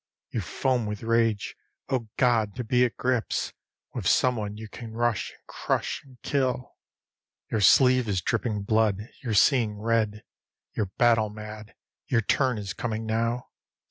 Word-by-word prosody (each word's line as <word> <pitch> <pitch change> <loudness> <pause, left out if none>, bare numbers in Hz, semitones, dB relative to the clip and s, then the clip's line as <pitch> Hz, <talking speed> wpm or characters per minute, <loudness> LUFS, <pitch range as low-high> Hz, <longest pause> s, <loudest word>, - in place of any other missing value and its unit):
You 115 - -1
foam 125 +4 0
with 105 0 -5
rage. 115 -2 +1 0.3
Oh, 125 -4 -1
God! 115 -5 +2
to 125 - -3
be 125 +2 +3
at 120 - -4
grips 125 -3 -1 0.4
With - - -3
someone 110 -5 +2
you 110 0 -7
can 115 +1 -9
rush 120 -1 0
and - - -22
crush - - -2
and 130 -3 -18
kill. 130 -3 -1 0.8
Your 110 - +1
sleeve 125 +6 +6
is 95 -2 +1
dripping 105 +2 -1
blood; 110 +1 +1
you're 115 -5 -2
seeing 110 -2 +4
red; 110 -1 0 0.5
You're 105 - 0
battle 115 -3 +4
mad; 105 +1 -9 0.3
your 120 -3 +2
turn 125 +3 +1
is 100 -2 -4
coming 110 -2 -3
now. 115 +2 -1
115 Hz, 150 wpm, -27 LUFS, 105-125 Hz, 0.8 s, sleeve